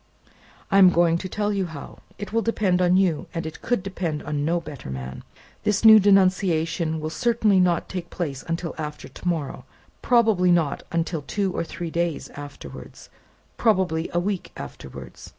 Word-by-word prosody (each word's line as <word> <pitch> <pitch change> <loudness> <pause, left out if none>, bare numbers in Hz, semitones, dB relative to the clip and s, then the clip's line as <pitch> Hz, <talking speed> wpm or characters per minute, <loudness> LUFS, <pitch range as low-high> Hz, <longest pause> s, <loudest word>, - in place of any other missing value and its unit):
"I 195 - +5
am 185 -2 +9
going 170 -1 +3
to 185 - -6
tell 210 +1 -1
you 195 -2 -1
how. 155 -4 -10 0.2
It 205 +1 -7
will 230 - +2
depend 200 -5 +1
on 180 0 +4
you, 180 -5 +1
and 165 0 -3
it 160 - -7
could 240 -6 0
depend 175 -6 -3
on 150 -1 -2
no 170 +3 +1
better 150 - -9
man. 65 0 -6 0.4
This 210 +1 +1
new 220 -1 +10
denunciation 185 -5 +2
will 155 0 -4
certainly 225 -3 +2
not 175 -2 +2
take 180 -2 -6
place 145 -7 -4
until 165 0 -3
after 150 -1 -6
to - - -9
morrow; 155 -7 -2 0.4
probably 220 -7 +3
not 165 -5 +1
until 165 -1 -1
two 195 +5 -2
or - - -1
three 170 0 -6
days 170 -1 -2
afterwards; 145 0 -10
more - - -29 0.4
probably 185 -7 +1
a 175 - +1
week 190 +1 -3
afterwards. 70 - -9
175 Hz, 175 wpm, -24 LUFS, 160-195 Hz, 0.4 s, new